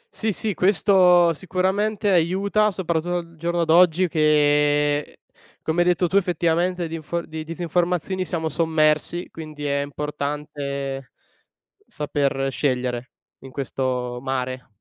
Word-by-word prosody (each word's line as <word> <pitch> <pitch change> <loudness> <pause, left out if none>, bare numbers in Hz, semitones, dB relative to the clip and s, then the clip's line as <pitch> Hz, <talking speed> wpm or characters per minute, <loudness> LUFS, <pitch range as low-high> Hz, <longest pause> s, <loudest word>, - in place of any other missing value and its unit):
Sì, 220 0 -1
sì, 210 +1 -2
questo 180 -2 +4
sicuramente 195 +5 -1
aiuta, 195 +5 +2
soprattutto 175 -2 -1
al 170 -1 -7
giorno 170 +1 -1
d'oggi, 175 +2 +4
che 150 -1 +2 0.4
come 160 +2 +1
hai 175 - +2
detto 180 0 +2
tu 190 - +1
effettivamente, 175 -1 +1
di 165 - -5
info 165 +2 -3
di 160 0 -6
disinformazioni 175 +2 -1
siamo 160 -1 -2
sommersi, 160 +1 +1
quindi 155 -2 -8
è 140 0 0
importante, 140 -1 -4 0.7
saper 140 - -1
scegliere 125 -2 -2 0.3
in 135 - -12
questo 130 -2 -3
mare. 130 -1 -3
160 Hz, 120 wpm, -23 LUFS, 145-180 Hz, 0.7 s, questo